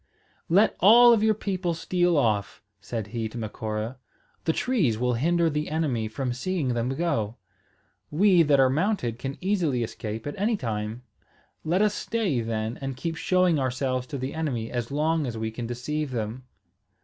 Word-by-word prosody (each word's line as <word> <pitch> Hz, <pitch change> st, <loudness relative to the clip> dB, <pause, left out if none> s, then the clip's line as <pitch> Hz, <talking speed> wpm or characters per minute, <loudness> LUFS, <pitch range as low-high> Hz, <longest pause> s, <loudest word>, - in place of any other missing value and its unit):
"Let 195 Hz, +6 st, +4 dB
all 235 Hz, +5 st, +8 dB
of 225 Hz, -, +2 dB
your 215 Hz, 0 st, +3 dB
people 185 Hz, -4 st, -2 dB
steal 175 Hz, 0 st, +1 dB
off," 105 Hz, -7 st, 0 dB, 0.2 s
said 110 Hz, +2 st, -4 dB
he 115 Hz, -2 st, -2 dB
to 120 Hz, -, -9 dB
Macora. 110 Hz, +2 st, -4 dB, 0.5 s
"The 160 Hz, -, +3 dB
trees 165 Hz, -, +1 dB
will 125 Hz, +1 st, +1 dB
hinder 170 Hz, +7 st, +2 dB
the 150 Hz, -1 st, -1 dB
enemy 145 Hz, -8 st, -1 dB
from 125 Hz, +3 st, -3 dB
seeing 150 Hz, +2 st, -2 dB
them 120 Hz, 0 st, 0 dB
go. 130 Hz, -7 st, -1 dB, 0.7 s
We 180 Hz, +3 st, +4 dB
that 145 Hz, -3 st, +4 dB
are 135 Hz, -, +6 dB
mounted 150 Hz, -, 0 dB
can 135 Hz, +2 st, -5 dB
easily 175 Hz, -, +1 dB
escape 110 Hz, 0 st, -5 dB
at 145 Hz, -, -3 dB
any 215 Hz, +2 st, +1 dB
time. 110 Hz, -, -4 dB, 0.6 s
Let 180 Hz, +6 st, +2 dB
us 210 Hz, -1 st, +2 dB
stay, 205 Hz, -, -1 dB
then, 110 Hz, 0 st, -3 dB
and 135 Hz, -2 st, -4 dB
keep 165 Hz, +5 st, -3 dB
showing 180 Hz, -2 st, +2 dB
ourselves 130 Hz, -1 st, -1 dB
to 140 Hz, -, -5 dB
the 130 Hz, +1 st, -4 dB
enemy 135 Hz, -8 st, -3 dB
as 120 Hz, -2 st, -3 dB
long 155 Hz, +1 st, 0 dB
as 115 Hz, -2 st, -4 dB
we 110 Hz, 0 st, -3 dB
can 115 Hz, +1 st, -5 dB
deceive 145 Hz, +5 st, -3 dB
them." 120 Hz, +1 st, -4 dB
135 Hz, 175 wpm, -26 LUFS, 115-170 Hz, 0.7 s, all